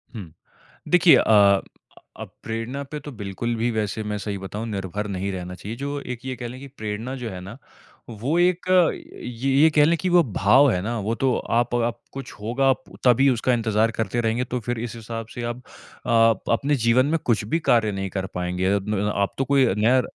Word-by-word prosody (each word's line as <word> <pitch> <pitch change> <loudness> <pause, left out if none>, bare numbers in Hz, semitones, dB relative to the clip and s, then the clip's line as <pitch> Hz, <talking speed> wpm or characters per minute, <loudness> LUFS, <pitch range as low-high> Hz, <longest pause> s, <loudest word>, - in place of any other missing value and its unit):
हुँ। 90 -7 -8 0.6
देखिए 180 -1 +6
अ 100 -2 +5 0.6
अ, - - -4 0.2
प्रेरणा 115 +5 -4
पे 150 - -4
तो 145 +1 -9
बिल्कुल 105 +2 -4
भी 115 +2 0
वैसे 110 0 -2
मैं 105 0 -3
सही 100 -1 -4
बताऊँ 95 +4 -6
निर्भर 105 0 -4
नहीं 95 0 -3
रहना 90 -1 -6
चाहिए। 105 +6 -7
जो 140 +1 -3
एक 125 +1 -7
ये 130 - -3
कह 120 - -5
लें 125 +2 -9
कि 140 - -8
प्रेरणा 110 +5 -4
जो 125 -3 -5
है 95 -3 -7
ना, 100 +7 -9 0.5
वो 120 +9 -2
एक 180 0 +2 0.6
ये 125 +3 -3
ये 160 - +7
कह 150 - +6
लें 170 +2 +2
कि 185 +2 -2
वो 175 -1 +5
भाव 130 +8 +5
है 90 - -1
ना, 115 +4 -3
वो 110 +3 -2
तो 130 -1 +1
आप 120 +1 0
आप 120 0 -1
कुछ 135 -2 -7
होगा 135 +5 +2 0.3
तभी 125 +3 +5
उसका 125 0 +1
इंतज़ार 110 -1 +1
करते 115 +1 -2
रहेंगे 115 +2 0
तो 125 0 -3
फिर 120 0 -3
इस 120 0 -5
हिसाब 115 0 -6
से 120 - -5
आप 120 +1 -4 0.4
अ, 115 -3 +3
अपने 140 +5 +1
जीवन 125 +3 +4
में - - 0
कुछ 115 -3 +1
भी 165 +10 0
कार्य 115 -8 +2
नहीं 95 -1 -4
कर 95 0 -3
पाएँगे। 90 +1 -2
अ, 100 - +3 0.4
आप 100 0 0
तो 135 - 0
कोई 140 -2 +4
नया, 125 +4 +4
115 Hz, 210 wpm, -23 LUFS, 105-130 Hz, 0.6 s, ये